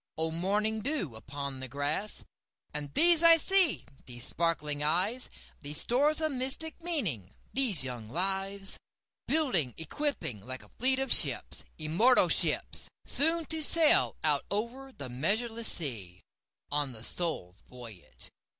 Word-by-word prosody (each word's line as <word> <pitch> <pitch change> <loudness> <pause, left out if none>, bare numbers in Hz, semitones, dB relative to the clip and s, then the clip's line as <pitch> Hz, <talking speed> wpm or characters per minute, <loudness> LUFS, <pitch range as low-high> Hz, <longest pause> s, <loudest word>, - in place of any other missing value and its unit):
O 160 0 -2
morning 210 +6 -1
dew 235 - -4
upon 140 +3 -6
the 130 - -5
grass! 145 +10 -3 0.5
And 145 -1 -6
these 340 -1 +6
I 335 -1 +7
see—these 265 - -1
sparkling 150 -3 -2
eyes, 185 +12 -1 0.3
These 145 -1 -6
stores 295 +6 +1
of 310 -1 -1
mystic 270 +6 0
meaning—these 210 - -1
young 120 -4 -6
lives, 195 - 0 0.5
Building, 190 - 0
equipping, 160 - -4
like 130 +2 -8
a - - -21
fleet 260 +2 +2
of 270 0 -3
ships—immortal 170 +12 +2
ships! - - +2 0.2
Soon 325 +3 +4
to 320 0 -1
sail 315 +1 +5
out 150 -2 +1
over 240 +6 -5
the 140 - -8
measureless 220 - 0
seas, 105 - -1 0.5
On 145 -3 -1
the 110 -1 -8
Soul's 115 - -3
voyage. 110 - -9
180 Hz, 125 wpm, -29 LUFS, -, 0.5 s, I